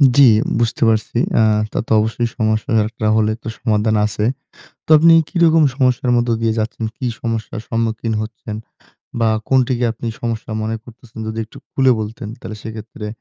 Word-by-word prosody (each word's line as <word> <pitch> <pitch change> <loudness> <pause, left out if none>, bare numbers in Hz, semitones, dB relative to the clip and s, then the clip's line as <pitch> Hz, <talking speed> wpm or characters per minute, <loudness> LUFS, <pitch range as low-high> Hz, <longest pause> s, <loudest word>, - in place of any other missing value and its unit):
জি, 140 - +7 0.4
বুঝতে 115 0 0
পারছি। 110 +1 0 0.2
অ্যা 110 - +5 0.3
তা - - -2
তো - - -9
অবশ্যই 115 +2 0
সমস্যা 110 +3 0 0.2
একটা 115 -1 -5
হলে 110 0 +2
তো - - -7
সমাধান 110 -1 +1
আছে। 105 0 -1 0.6
তো - - -25
আপনি 165 +2 +6 0.2
কি - - -27
রকম 160 -1 +5
সমস্যার 125 -2 +1
মধ্যে 120 0 +1
দিয়ে 115 -1 +1
যাচ্ছেন? 115 +2 -3
কি 130 - -4 0.2
সমস্যার 115 -1 -3
সম্মুখীন 115 0 -1
হচ্ছেন 110 0 -7 0.7
বা 115 - +3 0.2
কোনটিকে 130 -2 +2
আপনি 115 +1 -8 0.2
সমস্যা 115 -1 -3
মনে 110 +1 -2
করতেছেন? 120 -1 -15
যদি 110 +1 -4
একটু 110 - -18
খুলে 130 -1 +3
বলতেন 110 0 -6
তাহলে 105 - -7
সেক্ষেত্রে 110 -1 -8
115 Hz, 170 wpm, -18 LUFS, 110-120 Hz, 0.7 s, জি